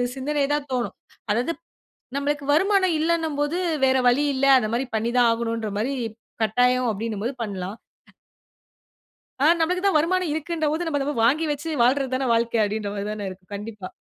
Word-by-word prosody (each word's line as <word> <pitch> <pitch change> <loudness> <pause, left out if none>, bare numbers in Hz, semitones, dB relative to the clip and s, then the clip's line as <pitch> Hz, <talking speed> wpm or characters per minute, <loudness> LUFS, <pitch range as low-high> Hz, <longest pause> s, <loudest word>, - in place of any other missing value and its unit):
சிந்தனைதான் 290 +1 -1
தோணும். 245 -2 -2 0.4
அதாவது, 245 +10 0 0.6
நம்மளுக்கு 285 0 -1
வருமானம் 375 +1 +3
இல்லனும்போது 320 -1 0 0.3
வேற 265 0 +3
வழி 260 +4 +2
இல்ல, 265 +1 +1
அந்தமாரி 235 +2 0
பண்ணிதான் 235 +2 +2
ஆகணுன்றமாரி 230 0 -2 0.5
கட்டாயம் 250 +3 +2
அப்பிடினம்போது 220 +3 -3
பண்லாம். 195 -1 -5 1.7
ஆ - - +5
நம்மளுக்கு 360 +4 0
தான் 390 - +3
வருமானம் 360 +2 +1
இருக்குன்ற 315 +1 -2
போது, 325 +3 -1
நம்ம 290 -3 -1
அத 285 +2 -1
வாங்கி 300 +7 +3
வச்சு 290 +3 -5
வாழ்றது 260 +2 +2
தான 260 0 -1
வாழ்க்க 230 -1 +1
அப்டினற 205 0 -3
மாதிரி 200 0 -4
தான 205 -2 -4
இருக்கு. 185 0 -13
கண்டிப்பா. 205 -2 -7
260 Hz, 140 wpm, -24 LUFS, 225-300 Hz, 1.7 s, ஆ